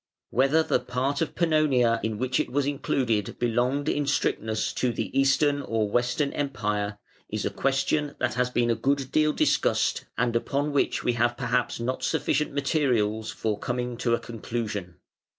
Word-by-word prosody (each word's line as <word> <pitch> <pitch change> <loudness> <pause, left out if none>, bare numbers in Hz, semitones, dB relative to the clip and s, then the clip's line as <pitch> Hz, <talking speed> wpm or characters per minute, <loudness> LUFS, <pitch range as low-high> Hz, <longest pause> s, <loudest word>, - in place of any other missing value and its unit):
Whether 135 +6 +3
the 150 -5 +1
part 130 +4 -2
of 165 - -2
Pannonia 145 -8 +3
in 110 -1 -2
which 130 +2 0
it - - -1
was 140 +1 +1
included 125 -6 -1
belonged 125 +5 0
in 145 -2 0
strictness 110 -6 0
to 125 - 0
the 120 - -4
Eastern 135 +1 +3
or 110 -5 -1
Western 125 +5 +1
Empire, 105 -7 -2 0.3
is - - -3
a - - -1
question 140 +2 0
that - - 0
has 125 0 +1
been 120 -1 +1
a - - +2
good 135 0 0
deal 155 0 +3
discussed - - +1
and 120 -1 +1
upon 140 +5 0
which 145 - +1
we 120 - +2
have 120 +1 +1
perhaps 125 -1 0
not 125 +2 -2
sufficient 150 +2 0
materials 125 -7 0
for 105 -2 -2
coming 125 0 -2
to 115 -1 +2
a - - -5
conclusion. 110 -5 -5
125 Hz, 170 wpm, -26 LUFS, 115-140 Hz, 0.3 s, Whether